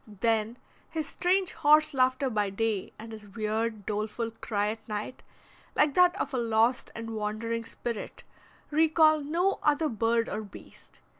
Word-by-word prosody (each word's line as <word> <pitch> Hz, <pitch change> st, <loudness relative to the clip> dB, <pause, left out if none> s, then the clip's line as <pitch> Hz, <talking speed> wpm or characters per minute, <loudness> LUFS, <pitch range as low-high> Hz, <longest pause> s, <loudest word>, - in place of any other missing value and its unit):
Then 220 Hz, +2 st, 0 dB, 0.3 s
his 315 Hz, -2 st, -3 dB
strange 365 Hz, +5 st, +1 dB
horse 305 Hz, +1 st, +4 dB
laughter 260 Hz, 0 st, +2 dB
by 210 Hz, -2 st, 0 dB
day 210 Hz, 0 st, -2 dB
and 225 Hz, +1 st, -9 dB
his 215 Hz, -1 st, -10 dB
weird, 215 Hz, 0 st, -2 dB
doleful 215 Hz, +2 st, -2 dB
cry 210 Hz, -2 st, -2 dB
at 220 Hz, +1 st, -7 dB
night, 210 Hz, +4 st, -5 dB, 0.5 s
like 295 Hz, -1 st, +3 dB
that 360 Hz, +2 st, +4 dB
of -, -, -2 dB
a 255 Hz, -, 0 dB
lost 230 Hz, +1 st, +1 dB
and 230 Hz, 0 st, -6 dB
wandering 225 Hz, +2 st, -3 dB
spirit, 230 Hz, -1 st, -6 dB, 0.5 s
recall 310 Hz, 0 st, +4 dB
no 340 Hz, +7 st, 0 dB
other 300 Hz, +1 st, +2 dB
bird 230 Hz, +1 st, +1 dB
or 215 Hz, -, -3 dB
beast. 205 Hz, -, -14 dB
230 Hz, 150 wpm, -28 LUFS, 215-295 Hz, 0.5 s, horse